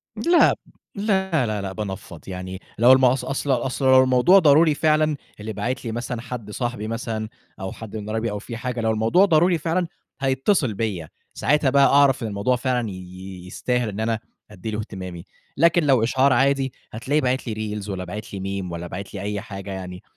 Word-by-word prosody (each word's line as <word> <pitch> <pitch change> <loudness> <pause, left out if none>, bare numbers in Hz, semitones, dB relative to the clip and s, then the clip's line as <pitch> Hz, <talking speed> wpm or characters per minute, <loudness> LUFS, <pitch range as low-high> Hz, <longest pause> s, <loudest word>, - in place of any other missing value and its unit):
لأ، 345 0 +4 0.4
لأ، 190 - +1
لأ، 105 -2 -2
لأ، 95 -1 -4
بانفّض 95 -5 -6
يعني، 95 0 -6 0.2
لو 120 +3 +7
الم 130 0 +6
أص 125 +1 +2
أصل 135 +1 -2
أصل 130 +2 -1
لو 130 0 +7
الموضوع 130 +10 +5
ضروري 155 -1 +5
فعلًا، 155 0 +2 0.2
اللي 110 +1 -5
باعِت 125 +4 -3
لي 115 - -2
مثلًا 120 0 -4
حد 120 -4 -7
صاحبي 120 -2 -3
مثلًا 115 -1 -3 0.3
أو 95 0 -4
حد 110 -1 -9
من 105 0 -6
قرايبي 110 0 -1
أو 105 - -4
في 115 +2 -7
حاجة، 125 -1 -3
لو 110 0 +1
الموضوع 115 - +4
ضروري 175 0 +4
فعلًا، 165 +3 -1 0.3
هيتصل 135 - +1
بيّا، 95 -7 -3 0.2
ساعتها 145 +1 +2
بقى 140 +1 +5
أعرف 135 -3 +4
إن - - -1
الموضوع 105 +5 0
فعلًا 125 -2 -1
ي - - -6
ي 95 0 -10
يستاهل 125 +4 -1
إن 100 +1 -6
أنا 110 0 0 0.3
أدي 105 +2 -6
له 105 - -3
اهتمامي، 95 -5 -7 0.3
لكن 170 +2 +4
لو 130 -5 +4
إشعار 130 +3 +3
عادي، 135 +1 +2 0.2
هتلاقيه 135 +7 0
باعِت 130 0 -1
لي 110 -1 -3
reals 105 - -8
والّا 95 -2 -3
بَعِت 100 +4 -7
لي 100 - -4 0.2
Meme، 90 - -6
والّا 85 0 -5
بَعِت 100 +2 -7
لي - - -5
أي 100 -1 -3
حاجة 100 -2 -8
يعني، 90 -1 -7
115 Hz, 200 wpm, -23 LUFS, 105-135 Hz, 0.4 s, لو